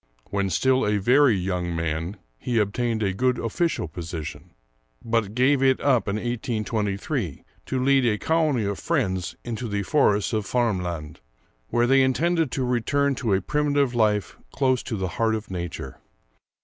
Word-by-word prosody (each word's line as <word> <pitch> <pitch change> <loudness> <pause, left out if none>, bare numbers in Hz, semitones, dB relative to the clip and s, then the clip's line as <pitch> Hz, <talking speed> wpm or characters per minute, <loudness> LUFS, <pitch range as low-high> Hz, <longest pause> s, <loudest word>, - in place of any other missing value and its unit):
When 100 -1 0
still 130 +9 +2
a 105 0 +1
very 125 +4 +4
young 90 -2 -2
man 80 +4 -2 0.2
he 120 -2 -1
obtained 110 +2 0
a 95 -2 0
good 125 +5 +1
official 140 - -1
position, 80 -1 -7 0.6
but 115 -2 0
gave 130 +2 +3
it 130 -1 +3
up 130 -6 +2
in 100 - 0
1823 110 - -2 0.2
to 130 -1 -1
lead 135 -2 +4
a 105 -2 +2
colony 155 -4 +1
of 100 -1 -2
friends 95 - -1
into 120 +1 -4
the 100 -1 -2
forests 105 -4 +2
of 105 -3 -1
Värmland, 90 -11 -1 0.5
where 120 - +2
they 135 +2 +5
intended 160 +4 +2
to 130 - -1
return 140 +4 +1
to 115 -7 0
a 95 - 0
primitive 145 +1 +1
life 105 -4 +1
close 130 -2 +1
to 110 - -4
the 95 -1 -2
heart 110 -1 +2
of 110 -2 -6
nature. 85 -7 -6
115 Hz, 160 wpm, -24 LUFS, 95-130 Hz, 0.6 s, they